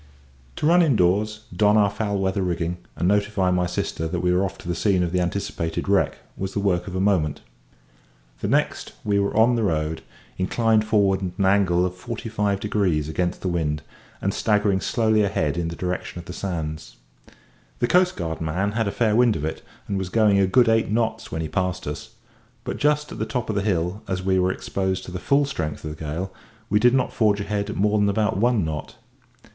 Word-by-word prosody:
To - - -2
run 175 +3 +6
indoors, 110 - +2
don 105 0 +4
our 100 -2 +4
foul 100 -1 -2
weather 95 0 0
rigging, 85 -1 -1 0.2
and 85 - 0
notify 100 -2 +2
my 90 0 +1
sister 80 -2 -2
that 85 +2 -2
we 90 0 +2
were 90 +2 +2
off 95 0 -3
to - - -12
the 85 - 0
scene 95 +1 +2
of 85 - -2
the 90 0 +1
anticipated 85 -2 -2
wreck, 100 0 +2 0.2
was 95 0 -4
the - - -1
work 100 -2 0
of 95 - -6
a - - 0
moment. 90 -7 +1 1.0
The - - -2
next - - 0
we 100 -1 +1
were 100 0 +1
in 115 +3 +5
the 120 - +1
road, 80 -5 -1 0.4
inclined 110 +3 +2
forward 100 -3 +3
at 90 -1 -4
an 100 - +1
angle 95 -2 +3
of 90 - -2
forty 115 +4 -6
five 105 -2 0
degrees 95 -8 0
against 90 +2 -2
the - - -2
wind, 75 -4 -1 0.4
and 100 - +1
staggering 105 -4 +1
slowly 110 -2 +2
ahead 80 -7 0
in 85 -1 -1
the 85 - -5
direction 90 0 -4
of 85 - -8
the - - -7
sands. 80 -5 -5 0.8
The - - +1
coastguard 110 - +1
man 90 +6 -1
had 110 0 0
a - - 0
fair 110 -1 +1
wind 120 -2 +4
of 75 - -3
it, 80 - -4 0.3
and 100 -1 -1
was 95 -2 -3
going 105 -1 +4
a 95 - +4
good 120 +5 +4
eight 115 0 +3
knots 115 +1 -1
when 80 - -2
he - - -3
passed 90 +1 -2
us; 75 0 -6 0.5
but - - -4
just 150 0 +1
at - - -7
the - - 0
top 125 -4 -2
of - - -4
the 100 - +1
hill, 95 0 -1
as 95 -1 -2
we 95 0 +2
were 90 0 +2
exposed 95 0 -2
to - - -8
the 90 - -4
full 140 +5 +2
strength 80 - -4
of 75 0 -5
the 80 - -9
gale, 85 +6 -4 0.4
we 105 - +4
did 125 +3 +5
not 130 - 0
forge 105 -2 +2
ahead 100 0 -2
at - - -4
more 105 +2 +2
than 100 0 +3
about 105 +1 +1
one 115 -3 +2
knot. 75 -2 -5
95 Hz, 220 wpm, -23 LUFS, 90-105 Hz, 1.0 s, run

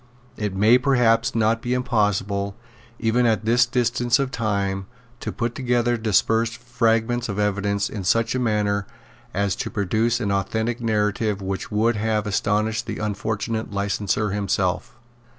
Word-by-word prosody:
It 105 -4 -3
may 110 +6 +5
perhaps 125 -2 +2
not 115 0 +2
be 125 +1 -1
impossible, 105 -5 0 0.4
even 120 +1 +2
at 110 -1 +1
this 120 +2 +4
distance 120 0 +1
of 135 -2 -1
time, 100 -4 -1 0.3
to - - -4
put 120 0 -2
together 120 -2 +1
dispersed 115 +1 +1
fragments 120 -1 0
of 100 - -3
evidence 100 0 0
in 100 -3 -6
such 115 +5 +2
a 130 - 0
manner 105 -4 0 0.4
as 100 0 0
to - - -3
produce 110 +4 0
an 105 -4 -1
authentic 110 +5 -1
narrative 105 -2 0
which 95 -1 -4
would 110 +2 +2
have 110 0 0
astonished 105 +2 0
the 110 - -4
unfortunate 110 +1 -2
licenser 100 +1 -1
himself. 100 +3 -1
110 Hz, 145 wpm, -23 LUFS, 100-120 Hz, 0.4 s, may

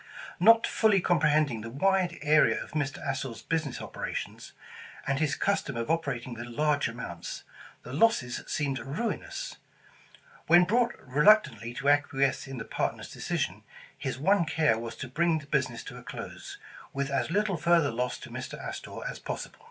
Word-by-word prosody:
Not 225 +5 +7
fully 215 -3 +3
comprehending 150 -8 +2
the 115 - -6
wide 180 +6 +1
area 155 +1 +4
of - - -14
Mr. 145 -2 -2
Astor's 130 -4 -3
business 155 -6 -2
operations, - - -6 0.5
and 140 0 0
his 150 -2 +1
custom 150 -10 0
of 115 +6 -1
operating 135 -7 -2
with 120 +1 -7
large 145 +4 +1
amounts, 115 -8 -6 0.4
the 125 - -8
losses 145 - +2
seemed 140 -2 -1
ruinous. 390 - -4 0.9
When 175 +1 +7
brought 235 +5 +2
re 140 +4 +1
luctantly 125 - +4
to 140 - +1
acquiesce 140 -2 +2
in 135 -1 -6
the 110 - -5
partners' - - -3
decision, - - -2 0.3
his - - -4
one 180 +5 +3
care 155 -7 +2
was 115 0 -6
to 130 - -6
bring 165 +5 +2
the 150 - -8
business 130 -5 -1
to - - -9
a - - -10
close, - - -8 0.4
with 140 0 -2
as 140 - 0
little 200 0 +1
further 165 -2 +3
loss 125 +2 -2
to - - -9
Mr. - - -6
Astor - - -7
as - - -6
possible. - - -6
145 Hz, 165 wpm, -29 LUFS, 130-175 Hz, 0.9 s, Not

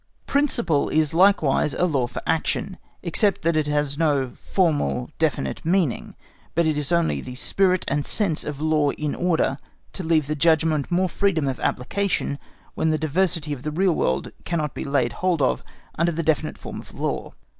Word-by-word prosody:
Principle 235 - +1
is 155 -1 +1
likewise 165 -6 +3
such - - -6
a 180 - +4
law 135 -8 +1
for - - -7
action, 165 +3 -1 0.2
except 195 +3 +1
that 165 0 +2
it 155 -1 +1
has 145 0 -1
not 140 -6 +1
the - - -20
formal 150 - 0
definite 65 -1 -1
meaning, 170 -6 0 0.4
but 170 0 +3
is 150 -1 0
only 170 -1 +1
the 125 - -8
spirit 185 +7 +1
and 145 +1 0
sense 185 -4 0
of 145 -2 -5
law 155 -1 +2
in 150 -1 -3
order 165 -6 0 0.3
to - - -4
leave 160 -2 +2
the 150 - -2
judgment 160 -1 +2
more 185 +2 +2
freedom 170 -5 +1
of 130 - -2
application 145 +1 -1 0.3
when 160 - 0
the 155 - +2
diversity 160 -1 0
of 135 - -7
the 150 - -3
real 180 +4 +2
world 65 - -1
cannot 155 -4 -2
be - - -5
laid 130 -4 +1
hold 180 +1 0
of 130 - +1 0.4
under 170 +1 +3
the 165 +1 -2
definite 155 0 0
form - - -7
of - - -16
a - - -13
law. - - -3
155 Hz, 190 wpm, -23 LUFS, 145-175 Hz, 0.4 s, a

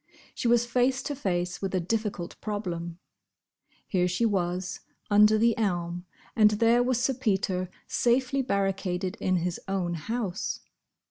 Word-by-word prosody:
She - - -2
was 240 0 +4
face 255 +2 +1
to 290 - -3
face 180 -7 -2
with 195 -1 -2
a - - +2
difficult 195 -1 -2
problem. 175 -5 -4 0.9
Here 180 -2 +1
she 180 +6 +1
was, 180 -2 -1 0.3
under 210 +1 +6
the 230 +1 +3
elm, 175 -3 -1 0.3
and 215 -3 +6
there 230 +3 +3
was 245 -1 +1
Sir 265 +2 +1
Peter, 190 -7 0 0.2
safely 260 +3 +1
barricaded 195 -5 -1
in 185 - 0
his 175 0 -1
own 190 -3 -1
house. 200 +3 -3
200 Hz, 140 wpm, -27 LUFS, 180-235 Hz, 0.9 s, under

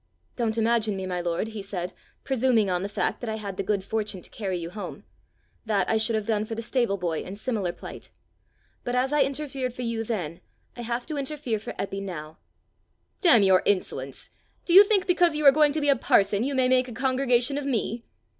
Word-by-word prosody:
"Don't 230 -2 -1
imagine 225 -2 +2
me, 190 - -4
my 180 -1 -2
lord," 175 +5 -2
he 220 -2 -6
said, 185 -2 -5 0.3
"presuming 245 -6 +2
on 180 0 0
the 200 - -3
fact - - -2
that 240 - -4
I 220 - -2
had 200 -3 -6
the - - -2
good 195 0 -1
fortune 210 -1 -2
to - - -11
carry 190 -4 -3
you 170 0 -6
home: 205 +2 -7 0.6
that 205 -4 0
I 220 - +2
should 220 +1 +1
have 215 -1 -1
done 215 -1 0
for 225 +1 -5
the 230 - -5
stable 235 -5 0
boy 170 -4 -2
in 190 - -7
similar 210 -5 -2
plight. - - -10 0.7
But 245 - -2
as 260 +3 +1
I 295 - +4
interfered 270 -3 -2
for 250 - -5
you 230 -1 -2
then, 180 -8 -4 0.3
I 240 - -7
have 235 +1 -3
to 305 -2 -5
interfere 275 -5 -2
for 210 - -7
Eppie 195 0 -3
now." 160 -5 -7 0.8
"Damn 260 - +6
your 190 -1 +5
insolence! 140 -9 -1 0.3
Do 340 - +1
you 390 +3 +11
think 405 -2 +2
because 350 -3 +3
you 300 0 -1
are 275 - +10
going 300 +1 +4
to 310 +1 -2
be 290 - +1
a 280 - +6
parson, 200 -3 +2
you 275 +2 -1
may 260 -1 +3
make 255 0 +3
a 245 - -8
congregation 260 +1 +1
of 290 - -6
me!" 230 -2 -1
225 Hz, 220 wpm, -26 LUFS, 195-260 Hz, 0.8 s, you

